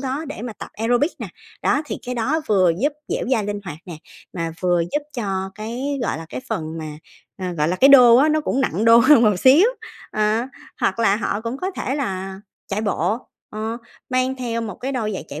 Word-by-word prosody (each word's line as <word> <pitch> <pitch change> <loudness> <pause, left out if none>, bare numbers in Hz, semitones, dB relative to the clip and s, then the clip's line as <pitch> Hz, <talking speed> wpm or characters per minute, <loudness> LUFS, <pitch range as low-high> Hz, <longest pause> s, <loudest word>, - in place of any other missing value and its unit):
đó 275 +4 -3
để 235 - -7
mà 245 - -5
tập - - -9
aerobic 245 +8 +1
nè, - - -5 0.4
đó 295 - +2
thì - - -4
cái 250 - -3
đó 265 +7 0
vừa 185 -5 +4
giúp 290 +2 +2 0.2
dẻo - - -2
dai 220 -5 +2
linh 205 0 -3
hoạt 160 -4 -7
nè, 175 - -7 0.4
mà 165 -2 -3
vừa 175 -2 +2
giúp 295 - 0
cho 190 -4 -2
cái, 250 +6 -4
gọi 195 - -1
là, 165 - -8
cái 125 - -6
phần 160 0 -4
mà, 155 -1 -6 0.5
ờ, 185 -1 -3
gọi 150 -2 0
là, 180 - 0
cái 270 - +6
đô 245 -4 +9
á, 290 +4 +5
nó 310 0 +2
cũng 275 -2 -1
nặng 220 -5 0
đô 230 0 +8
hơn 240 +1 +6
một 210 -4 +4
xíu. 290 - +7 0.4
Ờ, 215 +3 +1 0.3
hoặc - - 0
là 210 -3 +3
họ 205 -1 -2
cũng 230 +3 -4
có 370 +6 -3
thể 270 -7 -3
là 195 -8 -4 0.3
chạy 200 +2 -2
bộ, 205 +1 0 0.3
ờ, 220 +2 -4 0.3
mang 255 +1 +1
theo 235 -2 -3
một 210 -5 -5
cái 270 +2 -5
đôi 220 -5 -2
giày - - -5
chạy 150 - -7
225 Hz, 225 wpm, -21 LUFS, 190-260 Hz, 0.5 s, đô